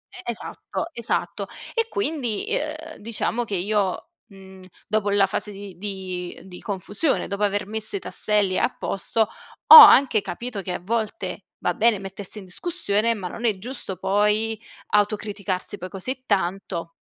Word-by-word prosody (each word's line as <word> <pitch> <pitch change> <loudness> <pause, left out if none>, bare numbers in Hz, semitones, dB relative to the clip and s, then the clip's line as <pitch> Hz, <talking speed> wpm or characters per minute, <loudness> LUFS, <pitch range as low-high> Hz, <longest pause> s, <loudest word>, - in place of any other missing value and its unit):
E - - -9
esatto, 235 - -6
esatto. 235 -1 -2 0.3
E 460 -1 +1
quindi, 290 - -2
uhm, 310 +1 -3
diciamo 230 +2 -2
che 205 - -3
io, 200 - -1 0.2
mhmm, 190 -2 -14 0.2
dopo 210 -1 0
la 200 -1 +4
fase 210 +2 -4
di 200 -2 -9
di 185 -3 -5
di 180 -2 -11
confusione, 205 - -1
dopo 200 +1 -4
aver 205 -1 +1
messo 220 0 -4
i - - -1
tasselli 205 -2 0
a - - +2
posto, 210 +3 -2 0.5
ho 470 - +12
anche 275 - +10
capito 220 +3 -5
che 180 -1 -4
a - - -3
volte 220 - -3 0.2
va - - +2
bene 225 -2 +3
mettersi 195 +2 -7
in 195 - -8
discussione, 230 - 0
ma 185 -3 -5
non 230 +7 -6
è 210 -4 +2
giusto 225 -3 -6
poi 210 +3 +1 0.3
autocriticarsi 205 -2 -1
poi 185 +1 -6
così 255 +8 -5
tanto. 180 -3 -1
205 Hz, 155 wpm, -24 LUFS, 190-230 Hz, 0.5 s, ho